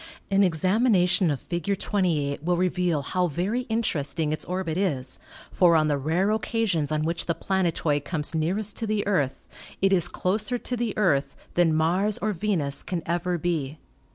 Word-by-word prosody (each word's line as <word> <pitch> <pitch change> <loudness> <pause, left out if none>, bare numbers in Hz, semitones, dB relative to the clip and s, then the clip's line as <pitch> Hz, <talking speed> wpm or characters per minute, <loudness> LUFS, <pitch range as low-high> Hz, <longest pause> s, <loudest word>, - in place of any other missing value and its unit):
An 195 0 +4
examination 185 0 +3
of 145 -3 -1
Fig. 175 +3 -2
28 160 -10 0
will 175 +1 +1
reveal 180 -4 0
how 180 +5 0
very 195 - -2
interesting 155 -9 0
its 155 - -4
orbit 180 -3 -3
is, 140 -9 -1 0.3
for 175 -2 +4
on 155 -1 +3
the 145 - +1
rare 170 +8 +1
occasions 205 -7 0
on 155 0 0
which 165 +1 -2
the 170 - +1
planet 190 -4 0
oid 145 -2 +2
comes 150 0 -3
nearest 190 +6 -1
to 225 - -2
the 210 -1 0
Earth 140 -10 0 0.4
it 195 0 +3
is 175 -2 +5
closer 210 +8 -1
to 245 - -4
the 235 -2 -2
Earth 160 -10 +1 0.2
than 170 -3 +3
Mars 180 +6 +2
or 215 0 -1
Venus 165 -7 0
can 175 -3 -4
ever 175 +1 -1
be. 155 -4 -2
175 Hz, 175 wpm, -25 LUFS, 155-195 Hz, 0.4 s, is